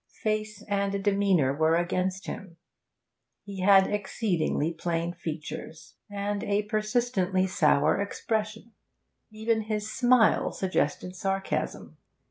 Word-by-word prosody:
Face 215 -2 -2
and 200 -1 -1
demeanour 195 -9 +2
were 160 +2 +3
against 185 +2 -1
him. 175 -4 -7 0.9
He 200 -2 -8
had 195 0 +6
exceedingly 185 -6 -1
plain 170 +1 -2
features, 160 0 -7 0.2
and 205 0 -3
a 205 +1 +1
persistently 215 -3 0
sour 155 -3 +3
expression; 215 +2 -3 0.6
even 220 +1 0
his 215 0 -3
smile 245 -2 +3
suggested 180 -1 -1
sarcasm. 195 +1 -3
195 Hz, 100 wpm, -27 LUFS, 175-215 Hz, 0.9 s, had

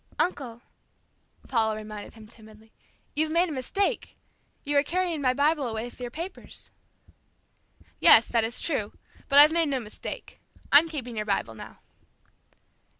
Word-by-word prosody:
"Uncle," 245 -9 -2 0.8
Paula 220 -4 +1
reminded 215 -1 -9
him 220 -1 -13
timidly, 220 0 -17 0.4
"you've 310 +1 +1
made 340 +3 +2
a - - -5
mistake. 385 - -2 0.5
You 290 +1 -2
are - - +1
carrying 345 -2 -1
my 255 -2 +2
Bible 290 0 +1
away 220 -1 -4
with 245 +1 -12
your 245 - -4
papers." 340 +8 -9 1.3
"Yes, 225 - +7
that 230 -2 +2
is 230 +2 -2
true, 225 -11 -2 0.4
but 275 - +3
I've 295 +2 +9
made 330 -2 +1
no 270 -2 0
mistake. 225 - -8 0.3
I'm 310 +3 +7
keeping 250 -7 -6
your 210 0 -3
Bible 155 - -1
now." 110 - -12
255 Hz, 150 wpm, -26 LUFS, 220-310 Hz, 1.3 s, I've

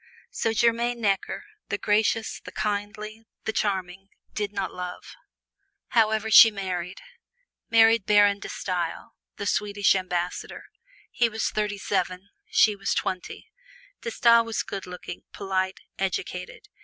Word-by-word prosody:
So 225 - 0
Germaine 235 +2 +1
Necker, 200 - -1 0.3
the 205 - -1
gracious, 215 +2 +1
the - - -9
kindly, 210 +1 -3 0.2
the 220 - -1
charming, 195 -2 -2 0.3
did 205 -2 -2
not 195 -2 -3
love. 180 0 -7 0.8
However, 220 -1 +2
she 225 - +10
married 185 -3 -4 0.7
married 225 -2 +5
Baron 205 -1 +5
De - - -7
Stael, 175 -3 -3 0.3
the 200 - -4
Swedish 205 +1 +2
Ambassador. 180 -2 -3 0.5
He 235 -1 +2
was 220 0 -2
thirty 210 -1 -1
seven, 190 0 -2 0.2
she 210 -1 +4
was 195 0 -1
twenty. 185 -1 -4 0.5
De 475 - -3
Stael 235 - +5
was 225 -1 -2
good 195 -2 -6
looking, 180 -1 -8
polite, 190 -1 -2 0.2
educated. 185 - -4
205 Hz, 130 wpm, -26 LUFS, 190-220 Hz, 0.8 s, she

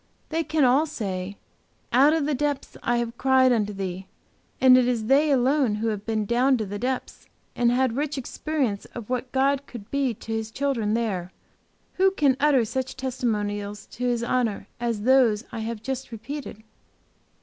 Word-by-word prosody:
They 325 +1 0
can 315 -2 +1
all 270 +6 +4
say, 195 -6 -4 0.6
'Out 275 +5 +6
of 315 -2 +1
the 300 - 0
depths 285 0 -2
have 240 0 +1
I 235 - -17
cried 260 -1 +4
unto 210 -3 +1
Thee,' 190 -1 -5 0.5
and 260 -1 +7
it 255 -1 +4
is 235 -3 0
they 280 +6 +4
alone 265 -3 +2
who 225 +2 -1
have 210 -1 -4
been 220 -2 0
down 245 +5 +3
into 225 -4 0
the 205 +1 -5
depths, 255 +2 -4 0.3
and 240 -1 +3
had 250 -1 +1
rich 290 +1 -2
experience 265 -4 -2
of 240 -1 -7
what 250 0 -2
God 275 +1 +1
could 230 -3 -10
be 275 -4 0
to 225 - -9
His 220 0 -2
children 230 -4 -1
there, 190 -6 -2 0.7
who 385 +1 +5
can 290 -8 +2
utter 280 -5 +4
such 260 +3 -4
testimonials 210 -5 -3
to 250 - -4
His 240 -1 0
honor, 235 -5 -1
as 230 -3 -2
those 245 -4 +4
I 230 - -5
have 225 0 -5
just 265 0 -4
repeated." 230 -1 -7
245 Hz, 180 wpm, -25 LUFS, 215-270 Hz, 0.7 s, and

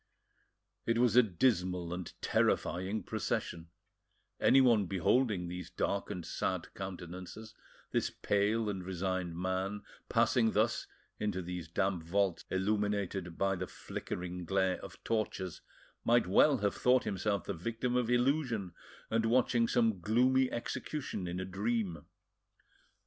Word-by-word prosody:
It 115 0 +2
was 120 -1 +3
a 125 - +10
dismal 90 -5 +1
and 90 -2 -5
terrifying 95 +4 +1
procession; 85 -1 -3 0.7
anyone 120 -7 +5
beholding 95 +1 +2
these 90 +1 -6
dark 100 0 -1
and 90 -3 -5
sad 95 -2 -2
countenances, 95 +3 -7 0.4
this - - +1
pale 105 +2 +1
and 95 -3 -3
resigned 95 -2 -2
man, 95 +3 -2 0.3
passing 115 -1 +3
thus 110 +3 +1 0.3
into 105 -3 -1
these 90 -2 -5
damp 90 +1 0
vaults 95 +2 0
illuminated 100 -3 -1
by 95 0 +1
the 95 0 -4
flickering 90 0 -6
glare 95 +1 +1
of - - -9
torches, 100 -6 -2 0.4
might 120 +1 +4
well 135 +10 +5
have 100 -3 0
thought 125 0 +3
himself 100 +1 -1
the - - -3
victim 115 +8 -2
of 125 -2 +1
illusion 125 - +1 0.4
and 115 0 +2
watching 120 -1 +3
some 115 -6 +2
gloomy 125 +6 +3
execution 120 -4 -4
in 90 +1 -3
a 95 - -3
dream. 100 -1 -2
100 Hz, 125 wpm, -33 LUFS, 90-115 Hz, 0.7 s, a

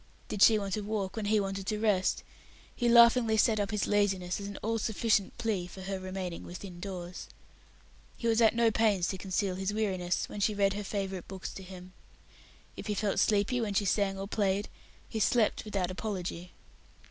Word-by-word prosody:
Did 205 - -4
she 220 +1 +8
want 200 -2 -3
to 215 - -1
walk 200 -2 -3
when 220 -2 -3
he 215 +1 +3
wanted 195 -1 -3
to 215 - 0
rest, 210 -4 +1 0.5
he 240 - +1
laughingly 235 -1 +6
set 215 0 +3
up 200 -1 0
his 210 -2 0
laziness 195 -3 +1
as 200 - -5
an 200 - -7
all 225 +1 0
sufficient 220 -2 0
plea 215 -7 -1
for 190 +2 -10
her 190 0 -3
remaining 185 -2 -5
within 180 0 -9
doors. 180 -1 -6 0.9
He 235 - -2
was 225 0 +3
at 225 0 +5
no 230 -1 +4
pains 210 -5 +2
to 190 - -4
conceal 190 0 -1
his 190 +2 -2
weariness 185 -5 -1
when 210 - -7
she 210 +1 +1
read 200 -1 +2
her 205 +1 -4
favourite 195 -3 -4
books 190 -1 -7
to - - -8
him. 185 -1 -11 0.8
If - - -8
he 210 - -1
felt 205 -1 0
sleepy 210 +4 +2
when 205 -3 -2
she 205 - +2
sang 195 0 +1
or 195 0 -5
played, 200 -1 0 0.4
he 220 - -4
slept 220 +1 +2
without 195 -4 -2
apology. 185 -3 -5
200 Hz, 195 wpm, -30 LUFS, 190-215 Hz, 0.9 s, she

